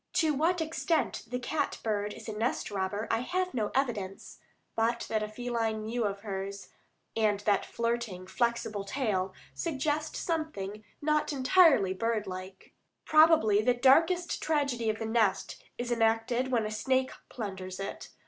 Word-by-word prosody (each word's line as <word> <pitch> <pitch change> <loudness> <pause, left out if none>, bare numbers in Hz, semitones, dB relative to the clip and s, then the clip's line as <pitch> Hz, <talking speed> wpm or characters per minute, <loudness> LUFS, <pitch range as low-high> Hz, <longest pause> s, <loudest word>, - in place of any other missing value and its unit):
To 315 -2 +3
what 330 +5 +1
extent 320 0 -1
the 250 - -3
cat 290 +5 -2
bird 210 -2 -1
is - - -11
a 220 - -3
nest 225 0 -1
robber 200 +2 -2
I 225 - +2
have 365 +8 -1
no 215 -4 0
evidence, 215 -8 -2 0.4
but 230 +1 +1
that 215 -1 -2
feline 230 -3 -1
mew 230 +1 -1
of 200 -1 -3
hers, 200 -1 -5 0.5
and 210 -2 +2
that 205 -2 +1
flirting, 230 -6 -2
flexible 220 0 -1
tail, 200 -5 -1 0.2
suggest 305 0 -2
something 215 - -3 0.2
not 305 0 +2
entirely 275 - +5
bird 220 +2 -1
like. 185 0 -8 0.3
Probably 310 -10 +5
the 245 +2 +3
darkest 330 +8 +3
tragedy 280 -7 0
of 215 - 0
the 225 - -4
nest 220 -3 0
is 245 0 -3
enacted 235 +2 +1
when 230 -3 +2
a 215 - -3
snake 260 +4 +1 0.2
plunders 190 -5 -6
it. 195 - -6
230 Hz, 150 wpm, -30 LUFS, 205-270 Hz, 0.5 s, entirely